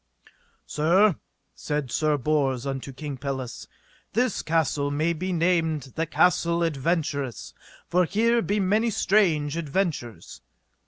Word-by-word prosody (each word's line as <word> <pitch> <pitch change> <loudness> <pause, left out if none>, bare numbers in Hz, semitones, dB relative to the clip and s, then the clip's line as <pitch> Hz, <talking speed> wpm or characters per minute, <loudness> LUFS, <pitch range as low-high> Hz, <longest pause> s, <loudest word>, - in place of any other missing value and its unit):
Sir, 175 +5 +3 0.4
said 150 -4 -3
Sir 155 -1 +1
Bors 135 -2 0
unto 135 0 -4
King 140 0 -6
Pelles, 130 -2 -5 0.5
this 245 -1 +1
castle 155 -3 0
may 155 +4 0
be 185 +3 -3
named 165 -6 0
the 165 0 -2
Castle 170 0 +2
Adventurous, 145 - -2 0.3
for 180 +1 +2
here 230 +6 +2
be 210 -1 0
many 210 +4 +2
strange 170 -9 +2
adventures. 155 - -3
160 Hz, 115 wpm, -25 LUFS, 145-180 Hz, 0.5 s, Sir